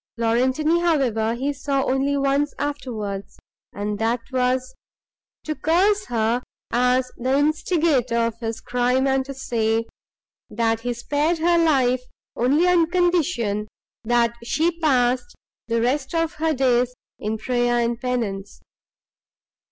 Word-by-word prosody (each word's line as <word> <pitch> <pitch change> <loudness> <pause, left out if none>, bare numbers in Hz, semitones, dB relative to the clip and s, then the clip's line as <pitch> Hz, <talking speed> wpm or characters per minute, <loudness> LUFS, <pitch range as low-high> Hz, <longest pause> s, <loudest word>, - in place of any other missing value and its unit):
Laurentini, 260 +8 +2
however, 240 -10 +1
he 275 +4 -2
saw 275 0 -1
only 275 +1 0
once 280 +1 +1
afterwards, 235 -9 -4 0.3
and 205 0 -4
that 230 +2 +1
was, 255 0 0 0.7
to 310 - -2
curse 390 +7 +2
her 230 +1 0 0.3
as 250 +1 +2
the 260 +3 +1
instigator 300 -4 +1
of 230 0 +1
his 225 -1 -4
crime, 250 +2 +1
and 265 -1 +1
to 275 0 -7
say, 225 -3 0 0.6
that 225 +1 0
he 245 +2 -3
spared 290 +8 0
her 340 +1 +3
life 260 -6 +3 0.3
only 285 +9 +2
on 345 -2 +3
condition, 335 - +1 0.4
that 235 0 +2
she 325 +8 0
passed 250 -5 +1 0.3
the 230 0 0
rest 265 +5 -1
of 330 0 0
her 320 0 0
days 250 -1 +2 0.2
in 215 +1 -2
prayer 240 +1 0
and 235 0 -1
penance. 210 -6 -3
255 Hz, 130 wpm, -23 LUFS, 235-295 Hz, 0.7 s, her